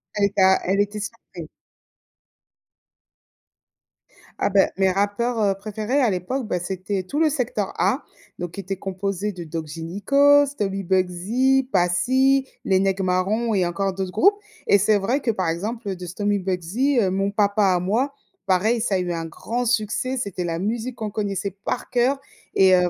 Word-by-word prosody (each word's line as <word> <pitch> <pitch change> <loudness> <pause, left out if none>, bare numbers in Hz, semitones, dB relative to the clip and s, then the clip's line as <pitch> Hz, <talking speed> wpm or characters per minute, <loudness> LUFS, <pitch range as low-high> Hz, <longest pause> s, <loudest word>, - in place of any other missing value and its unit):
Elle 205 - 0
éta 190 -1 +4
elle 195 +2 +1
était 205 +1 0
surprise. 195 -6 -8 2.9
Ah - - +1
bah, 195 0 +4
mes 190 -1 +3
rappeurs, 205 +5 0
heu, 195 -2 +2
préférés 215 +6 -2
à 245 - +3
l'époque, 205 +8 -2
bah, 180 -4 -1
c'était 185 +2 -3
tout 285 - -3
le 315 - +4
secteur 410 - -2
A, - - +1 0.3
donc 175 -1 -5
qui 200 - -9
était 195 0 -3
composé 195 +2 -3
de 175 -3 -8
Doc 160 0 -5
Gynéco, 275 - +3
Stomy 195 -8 -3
Bugsy, 205 +9 +1
Passy, 260 +10 +3 0.2
Les 190 -1 +3
Nèg' 195 0 +1
Marrons 195 +5 0
et 185 -3 +2
encore 190 +2 -1
d'autres 190 -1 -4
groupes. 405 - +4 0.3
Et 200 - +6
c'est 205 +1 +3
vrai 240 +9 0
que, 230 - +1
par 185 -5 -2
exemple, 210 +7 -3
heu, 190 - -2
de 180 0 -8
Stomy 205 +3 -1
Bugsy, 190 +9 0
heu, 190 -4 +2
Mon 195 +1 0
papa 205 -1 +2
à 175 - +1
moi, 230 +10 0 0.3
pareil 215 +5 +2
ça 210 -4 0
a - - +3
eu 175 -1 -2
un 165 -1 -3
grand 230 +9 -3
succès, 245 +3 0
c'était 200 -6 -3
la 165 -1 -2
musique 230 +5 -2
qu'on 215 -2 -4
connaissait 200 -1 -2
par 250 - -3
cœur 255 +3 +2 0.4
et 190 -1 +6
heu, 180 -1 +3
200 Hz, 175 wpm, -23 LUFS, 185-235 Hz, 2.9 s, Et